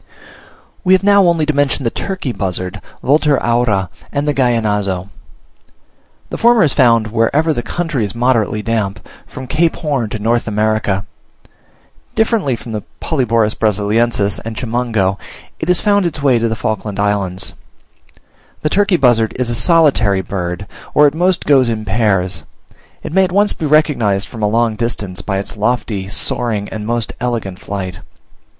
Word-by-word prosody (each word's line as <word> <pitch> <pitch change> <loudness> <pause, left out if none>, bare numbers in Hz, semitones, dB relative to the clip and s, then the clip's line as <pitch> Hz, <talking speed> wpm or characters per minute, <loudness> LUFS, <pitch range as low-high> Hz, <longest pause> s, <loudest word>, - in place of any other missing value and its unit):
We 185 - +4
have 190 - +3
now 200 -2 +5
only 165 -3 +2
to 155 - 0
mention 145 -1 +1
the 115 - 0
turkey 185 -9 -4
buzzard 95 -1 -3 0.2
(Vultur 145 +1 +3
aura), 115 -6 +1 0.2
and 145 +1 -2
the 150 - +2
Gallinazo. 105 -7 0 1.2
The - - -4
former 235 -2 +5
is 150 - +2
found 115 -5 +3
wherever 140 +8 +2
the 120 - -2
country 160 -3 -2
is 100 0 -4
moderately 115 -3 +1
damp, 110 -3 -2 0.2
from 130 - -8
Cape 160 +5 +1
Horn 140 -9 -2
to 110 - -4
North 115 +3 0
America. 105 -2 0 1.1
Differently 220 - +1
from 115 - -9
the 105 -1 -3 0.2
Polyborus 115 -7 +1
Brasiliensis 105 0 0
and 115 0 -6
Chimango, 110 -5 -1 0.4
it - - -3
has 180 -1 +2
found 205 -3 +3
its 150 -3 -5
way 130 -4 +4
to 115 0 0
the 110 - -1
Falkland 105 -2 -3
Islands. 100 -3 -1 1.1
The 155 - +1
turkey 200 -2 +3
buzzard 120 -5 +3
is 125 -2 -1
a - - 0
solitary 115 - +3
bird, 90 +1 -4 0.3
or 150 - +6
at 145 - +3
most 180 +2 +1
goes 135 -4 +4
in 110 -2 -3
pairs. 95 -4 +1 0.6
It - - -6
may 190 +1 +4
at 180 - -5
once 205 +2 +3
be 155 - -3
recognised 120 -10 +2
from 115 - -9
a 105 - +2
long 115 0 +1
distance, 105 -6 -3
by 95 -2 -2
its 100 +2 -5
lofty, 105 -3 -1
soaring, 105 +1 -1
and 105 -1 -6
most 120 -1 -2
elegant 115 -7 -3
flight. 95 -3 -5
115 Hz, 160 wpm, -16 LUFS, 105-145 Hz, 1.2 s, or